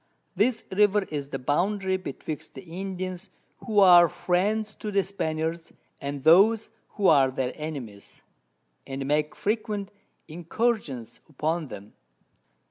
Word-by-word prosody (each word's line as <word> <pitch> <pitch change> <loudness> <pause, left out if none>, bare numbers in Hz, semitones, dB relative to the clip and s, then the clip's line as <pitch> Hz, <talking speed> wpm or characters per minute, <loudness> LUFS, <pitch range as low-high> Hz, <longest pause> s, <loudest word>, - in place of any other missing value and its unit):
This 225 +2 +1
River 205 +1 +3
is 140 -2 -4
the - - -3
Boundary 190 +8 0
betwixt 155 -4 -6
the - - -9
Indians 185 +1 -6 0.3
who 220 -3 -4
are 175 -3 +8
Friends 210 +6 0
to 215 - -4
the 200 -1 +2
Spaniards, 165 -3 -3 0.3
and 140 -1 -5
those 205 +7 +5 0.3
who 205 - -1
are 140 -4 +5
their 130 -1 -2
Enemies, 135 -10 -8 0.6
and 135 0 -4
make 150 +2 0
frequent 210 -2 -2 0.4
Incursions 165 - -2
upon 155 +2 -2
them. 105 -3 -10
175 Hz, 125 wpm, -26 LUFS, 145-200 Hz, 0.6 s, are